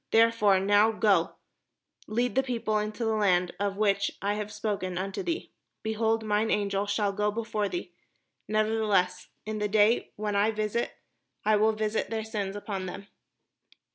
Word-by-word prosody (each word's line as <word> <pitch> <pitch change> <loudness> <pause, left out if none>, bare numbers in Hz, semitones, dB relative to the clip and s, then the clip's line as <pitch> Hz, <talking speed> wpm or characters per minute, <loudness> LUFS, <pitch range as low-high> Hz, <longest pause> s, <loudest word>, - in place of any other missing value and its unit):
Therefore 225 -4 +4
now 205 +3 +4
go, 200 -6 +2 0.7
lead 240 +1 0
the 265 - +3
people 240 -4 -2
unto 215 +2 -1
the 220 0 +1
place 180 -4 +2
of 200 -1 -1
which 200 -2 +2
I 200 +1 0
have 210 0 -4
spoken 205 -4 -3
unto 190 +1 -3
thee: 350 -2 -3 0.3
behold, 220 0 0
mine 210 +1 +1
Angel 200 -1 0
shall 205 0 0
go 210 +1 +1
before 210 -1 -2
thee; 350 - -5 0.5
nevertheless 215 -4 +1 0.2
in 215 0 -3
the 210 - 0
day 215 +3 +3
when 210 -1 -2
I 205 +2 +3
visit 215 +2 -1 0.5
I 215 0 +4
will 215 +1 +3
visit 215 0 -1
their 220 -1 -2
sin 205 -3 -3
upon 195 -2 -4
them." 200 +2 -8
210 Hz, 160 wpm, -28 LUFS, 200-220 Hz, 0.7 s, Therefore